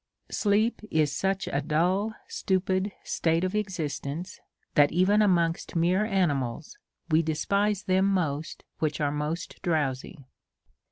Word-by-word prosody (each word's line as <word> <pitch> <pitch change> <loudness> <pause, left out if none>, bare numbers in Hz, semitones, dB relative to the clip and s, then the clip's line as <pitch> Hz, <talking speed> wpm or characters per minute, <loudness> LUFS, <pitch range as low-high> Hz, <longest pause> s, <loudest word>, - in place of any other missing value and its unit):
Sleep 215 +3 +1
is 150 -2 +1
such 195 +4 -1
a 140 - -1
dull 180 +9 +1
stupid 190 +1 0
state 165 +1 0
of 185 +1 -1
existence, 180 -4 -3 0.3
that 145 -1 +5
even 190 +5 +3
amongst 170 -6 +1
mere 180 +5 +2
animals, 150 - -1 0.4
we 155 +1 +5
despise 200 +6 0
them 190 +1 +2
most 160 -6 -1 0.2
which 155 -1 -1
are 145 -2 +1
most 150 +3 -4
drowsy. 145 -2 -2
175 Hz, 120 wpm, -27 LUFS, 150-195 Hz, 0.4 s, that